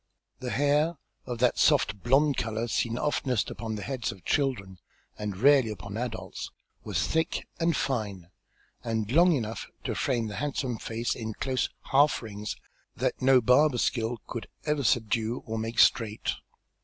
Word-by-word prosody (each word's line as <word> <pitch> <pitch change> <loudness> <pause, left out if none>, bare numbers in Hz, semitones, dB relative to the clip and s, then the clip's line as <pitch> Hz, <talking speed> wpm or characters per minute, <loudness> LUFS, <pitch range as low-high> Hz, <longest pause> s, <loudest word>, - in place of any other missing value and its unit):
The 130 -1 -4
hair, 145 +5 +2 0.3
of 120 - -3
that 125 +1 +2
soft 100 - +3
blonde 140 +4 +3
colour, 110 0 -2
seen 115 0 0
oftenest 130 -5 0
upon 110 -2 -4
the 105 - -5
heads 130 -5 -2
of 95 -4 -14
children, 105 - -1 0.4
and 105 -3 -4
rarely 135 +1 +5
upon 100 -1 -7
adults, 115 -1 -5 0.3
was - - -1
thick 160 0 -1
and 165 -1 +2
fine, 100 -9 -2 0.5
and 110 -2 -2
long 175 +5 +6
enough 115 -5 -3 0.2
to - - -2
frame 120 -3 0
the 105 -1 -5
handsome 135 -4 -2
face 115 +1 -2
in 110 -2 -5
close 130 -1 -1 0.2
half 140 -1 +4
rings 105 -1 -5 0.4
that - - -1
no 130 -1 +6
barber's 125 +2 +4
skill 115 0 0
could 115 - -6 0.2
ever 150 -2 0
subdue 115 0 +1
or 110 0 -3
make 115 +1 -4
straight. 110 -2 +3
120 Hz, 155 wpm, -28 LUFS, 110-135 Hz, 0.5 s, long